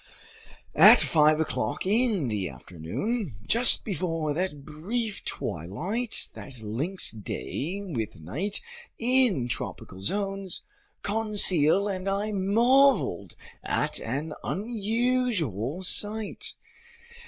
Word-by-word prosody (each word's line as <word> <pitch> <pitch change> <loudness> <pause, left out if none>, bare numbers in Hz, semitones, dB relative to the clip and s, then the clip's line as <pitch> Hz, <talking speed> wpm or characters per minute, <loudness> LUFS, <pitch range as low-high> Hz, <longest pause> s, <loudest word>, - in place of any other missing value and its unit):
At - - +8
five 155 -1 +3
o'clock 155 -1 -2
in 210 - +1
the 100 -6 -2
afternoon, 140 - -5
just 235 - +4
before 165 -5 -2
that 150 -4 -3
brief 205 +8 -4
twilight 185 - -3
that 125 -5 -8
links 145 - +1
day 145 - -5
with 115 - -5
night 160 - -3 0.4
in 240 - +2
tropical 95 -5 -5
zones, 195 - -3 0.4
Conseil 200 -4 +5
and 190 -1 -3
I 200 +2 -1
marveled 225 - +2 0.3
at - - -1
an 145 +7 -4
unusual 210 - -1
sight. 210 +3 0
190 Hz, 95 wpm, -26 LUFS, 145-215 Hz, 0.4 s, At